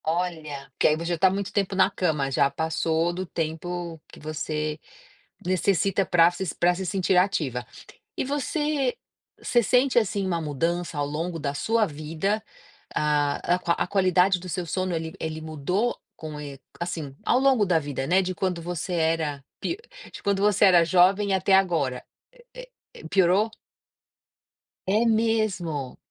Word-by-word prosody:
Olha, 160 -4 -3
porque - - +2
aí 155 - +3
você 165 - -5
já 170 - 0
tá 190 +3 +5
muito 200 +1 -3
tempo 195 -1 0
na - - +4
cama, 150 -6 0
já 140 +1 +3
passou 160 +3 0
do 185 +2 -3
tempo 165 0 -4
que - - -13
você 155 0 -3 0.6
necessita 190 +2 +1
pra 170 -1 +5
se 175 -1 -4
pra 175 +1 +3
se 190 +1 -4
sentir 185 0 +1
ativa. 150 -10 +1 0.5
E - - -1
você 290 -1 -1 0.4
você 240 - +2
sente, 250 +5 +3
assim, 200 -3 0
uma 170 -3 -1
mudança 165 +3 -2
ao 145 - 0
longo 165 +4 -3
da 140 -2 -2
sua 220 +10 +1
vida? 160 +7 -2 0.5
Ah, 150 +2 +1
a - - -5
qua 170 -2 0
a - - -1
qualidade 185 -1 +3
do 185 - -9
seu 180 +1 -2
sono 185 +1 -2
ele 160 0 -3
ele 160 0 -4
mudou 160 +9 -1 0.2
com 155 -2 -7
e 140 -2 -8 0.2
assim, 160 -5 -4
ao 245 - +3
longo 260 -6 +3
da 175 -3 +3
vida, 145 -3 -4
né, 185 +5 +3
de 185 0 -3
quando 180 -2 -2
você 175 +1 -4
era 160 -4 0 0.2
pi 340 - -2 0.3
de - - -11
quando 200 -1 +1
você 205 0 +4
era 180 -3 +7
jovem 190 +4 +4
até 190 +1 +3
agora, 165 -10 +2 0.3
eh 485 -1 -20
eh, - - -10 0.3
é. - - -7
Piorou? 195 +3 +3 1.4
É 210 +5 +2
mesmo. 215 - 0
175 Hz, 165 wpm, -25 LUFS, 155-195 Hz, 1.4 s, era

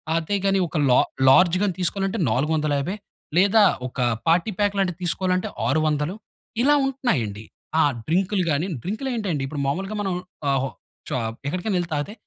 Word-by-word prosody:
అదేగాని 195 +3 +1
ఒక 160 - -4
లా 125 - +5 0.3
లార్జ్ 175 +6 +6 0.2
తీసుకోవాలంటే 195 +2 -1
450 150 - 0 0.4
లేదా 200 +3 +5 0.3
ఒక 125 - -9 0.3
పార్టీ 170 +6 +3
ప్యాక్ 205 -1 +1
లాంటిది 185 -3 0
తీసుకోవాలంటే, 185 +1 0 0.2
600 155 +2 +1 0.5
ఇలా 290 +2 +5
ఉంటున్నాయండి. 130 - -1 0.4
ఆ! - - +5 0.2
డ్రింకులు 185 +3 +1
గానీ 150 +5 0 0.2
డ్రింకులు 220 +9 -3
ఏంటండి, 185 -11 -2
ఇప్పుడు 145 0 -4
మామూలుగా 190 +9 -2
మనం 195 -2 -1 0.4
ఆహ్, 135 -1 +2
హొ - - -1 0.4
షా - - -1 0.3
ఎక్కడికైనా 185 +5 -1
ఎళ్ళి 175 -1 -3
తాగితే, 145 +7 -2
180 Hz, 140 wpm, -23 LUFS, 150-195 Hz, 0.5 s, లార్జ్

